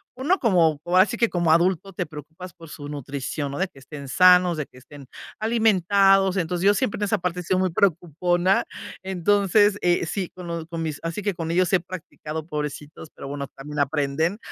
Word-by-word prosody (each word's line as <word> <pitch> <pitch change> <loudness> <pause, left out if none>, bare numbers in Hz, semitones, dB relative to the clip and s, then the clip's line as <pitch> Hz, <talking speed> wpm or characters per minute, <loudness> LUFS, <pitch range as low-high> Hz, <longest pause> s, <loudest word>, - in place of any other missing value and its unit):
uno 305 +10 +1
como, 170 - +3
ahora 185 +2 +5
si 230 +3 -5
que 235 -1 +2
como 170 -3 +1
adulto, 185 +3 +2
te 180 - -3
preocupas 160 +4 -10
por 165 -3 -14
su 145 -1 -8
nutrición, 140 0 -4
¿no? 140 - -5
De 190 - +1
que 135 - -18
estén 140 0 -10
sanos, 180 +3 +5
de 150 - -3
que 125 - -20
estén 140 +1 -14 0.3
alimentados. 195 -3 +3
Entonces, 175 +1 -1
yo 205 - +6
siempre 210 +1 -1
en - - -2
esa 215 +1 +1
parte 180 0 -2
he - - -10
sido 185 +2 0
muy 185 -2 +1
preocupona. 175 +1 +1 0.4
Entonces, 200 +2 +2
eh, 175 -1 +2
sí, 185 +1 -3
con 180 -1 -9
lo 170 -1 -4
con 165 -1 -5
mis 155 -2 -4
así 165 +5 -3
que 205 -2 0
con 165 -1 -4
ellos 180 +1 +1
he 180 - +4
practicado, 160 -3 -7
pobrecitos, 150 0 -6
pero - - -9
bueno, 140 -1 -5
también 150 +2 -6
aprenden. 145 +6 0
175 Hz, 205 wpm, -24 LUFS, 150-190 Hz, 0.4 s, yo